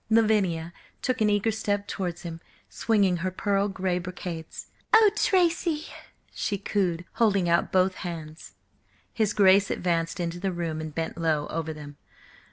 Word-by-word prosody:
Lavinia 200 -7 +2 0.3
took 255 -2 0
an 215 - +4
eager 205 +2 +2
step 205 -1 -2
towards 175 -2 -4
him, 165 -1 -7 0.3
swinging 200 -5 +2
her 185 +2 -1
pearl 200 +2 0
grey 185 -2 -1
brocades. 180 -2 -7 0.2
"Oh, 440 -2 +7
Tracy!" 340 -5 +2 0.5
she 200 - -2
cooed, 180 -4 -1 0.2
holding 200 -5 +3
out 170 0 +2
both 185 0 +3
hands. 160 - -7 0.6
His 220 -3 +1
Grace 195 0 +5
advanced 165 -1 -1
into 170 0 -3
the 190 +1 -1
room 165 -3 -3
and 155 -1 -7
bent 165 +1 -3
low 155 -3 +1
over 160 0 -2
them. 145 -2 -10
185 Hz, 150 wpm, -26 LUFS, 165-205 Hz, 0.6 s, Oh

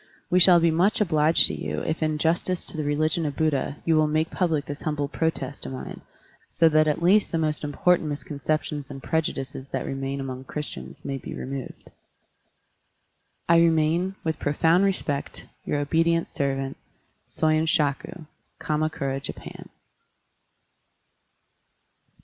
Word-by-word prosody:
We 180 - +5
shall 180 -1 +8
be 165 0 +3
much 190 +9 +2
obliged 160 -5 +4
to - - +1
you - - -4
if 160 +1 -3
in 155 -1 0
justice 170 +3 0
to - - -1
the 155 - -2
religion 155 +4 0
of 145 -2 -2
Buddha 145 -2 0
you 165 - +3
will 155 0 +4
make 155 +1 0
public 160 -5 0
this 145 0 -7
humble 150 -2 -1
protest 140 -3 -3
of - - -6
mine, 130 - -7 0.5
so 165 - +4
that 155 0 +4
at 150 +2 0
least 200 +4 +4
the 165 - 0
most 155 -1 -1
important 155 +2 +2
misconceptions 150 0 -3
and 135 - -9
prejudices 135 -4 -3
that - - -3
obtain 135 0 -3
among 130 -1 -6
Christians 65 - -6
may 135 -1 -3
be - - -7
removed. 135 -1 -7 1.6
I 170 0 +6
remain, 165 +3 +2
with 160 -1 -2
profound 165 +6 +3
respect, 155 -7 -2 0.2
Your - - -1
obedient 165 +3 +1
servant. 135 -1 -2 0.6
Katnakura, 155 -2 -1
Japan. - - -9
155 Hz, 140 wpm, -25 LUFS, 140-165 Hz, 1.6 s, shall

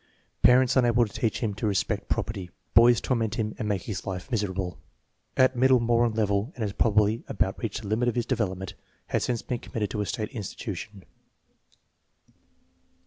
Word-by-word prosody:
Parents 125 0 +5
unable 120 -2 +4
to 105 - -11
teach 115 -4 -1
him 110 -4 0
to 105 +2 -2
respect 100 +1 -1
property. 95 -4 -2 0.2
Boys 120 0 +7
torment 115 -5 0
him 110 -1 -2
and 105 - -2
make 100 -3 -1
his 105 -4 -5
life 95 +3 -5
miserable. 95 -6 -2 0.6
At 130 0 +4
middle 130 +1 +5
moron 120 0 +2
level 105 +2 0
and 120 - -3
has 100 -2 -2
probably 110 +1 +2
about 95 -1 -1
reached 110 -1 -4
the - - -6
limit 110 +4 +1
of 120 - -3
his 120 -2 0
development. 95 -4 -2 0.4
Has - - 0
since 120 -2 -2
been 125 -2 -3
committed 105 -4 -4
to 105 - -2
a 105 - -2
state 110 -4 -3
institution. 105 -2 -6
110 Hz, 175 wpm, -27 LUFS, 100-120 Hz, 0.6 s, Boys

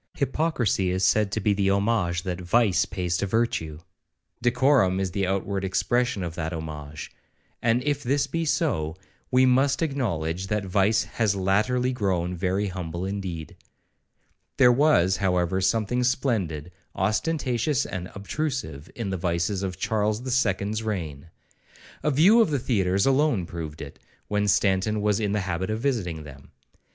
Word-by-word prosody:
Hypocrisy 135 - 0
is 95 +1 -1
said 105 +2 +3
to 110 - -1
be 105 0 +2
the 100 -1 +1
homage 100 -3 +1
that 90 -1 -4
vice 95 -1 +2
pays 90 -3 -2
to 100 - -1
virtue,—decorum 95 - 0
is 95 -1 -1
the 95 0 -1
outward 95 +1 -1
expression 120 +3 0
of 85 -2 -4
that 80 0 -4
homage; 75 -2 -7 0.5
and 120 +1 +2
if 145 0 0
this 140 +3 +1
be 165 0 -2
so, 80 - 0 0.3
we 130 0 +4
must 135 +4 +3
acknowledge 95 - -2
that 105 0 -1
vice 100 +4 +2
has 110 -4 0
latterly 110 +7 +1
grown 90 -6 -1
very 95 +3 -1
humble 90 -1 -5
indeed. 95 -5 -5 1.0
There 125 -3 +7
was, 120 - +3
however, 90 -1 +1
something 115 +5 +1
splendid, 100 - -1 0.2
ostentatious, 125 - 0
and 90 -1 -5
obtrusive, 100 - -4
in 110 -5 -3
the 95 - -2
vices 85 +3 -1
of 95 -3 -4
Charles 110 +3 0
the 130 - -4
Second's 105 -3 0
reign.—A 85 - -7
view 180 - +6
of 220 - +3
the 145 - +1
theatres 100 -6 +1
alone 135 - +2
proved 80 -3 -7
it, - - -11 0.3
when 105 0 0
Stanton 100 +2 +2
was 105 0 +1
in 105 -2 -1
the 105 - 0
habit 95 0 -3
of 110 +1 -1
visiting 95 - -1
them. 70 -2 -13
100 Hz, 150 wpm, -25 LUFS, 90-120 Hz, 1.0 s, There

